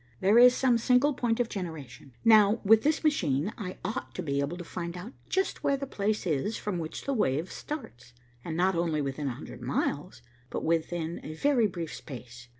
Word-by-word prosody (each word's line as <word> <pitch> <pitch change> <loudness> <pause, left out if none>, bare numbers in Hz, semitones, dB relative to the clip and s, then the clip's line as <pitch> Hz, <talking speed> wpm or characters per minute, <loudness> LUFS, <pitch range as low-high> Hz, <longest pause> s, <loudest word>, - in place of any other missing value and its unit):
There 205 +5 +5
is 250 +1 +8
some 250 -3 +3
single 250 +5 +3
point 240 -2 0
of 245 - +2
generation. 160 - -7
Now, 215 -1 +6
with 220 +2 +6
this 305 +1 +1
machine, 175 - +1
I 185 -4 -6
ought 215 - -4
to - - -3
be 140 -2 -1
able 140 +5 -2
to 175 - -6
find 170 0 -5
out 210 +9 -8 0.2
just 380 +1 -1
where 280 - +2
the 275 - -4
place 215 -5 -1
is 170 +6 -1
from 195 -4 -3
which 160 -1 -6
the 275 - 0
wave 165 - 0
starts, 125 - -7 0.3
and 160 -1 -4
not 185 +2 +3
only 165 -3 0
within 140 +1 -3
a 125 - -2
hundred 125 -2 -10
miles, 140 +3 -2 0.3
but - - -4
within 165 0 -1
a 155 - -7
very 250 - +3
brief 170 -4 -6
space. 120 -3 -10
180 Hz, 200 wpm, -29 LUFS, 150-230 Hz, 0.3 s, is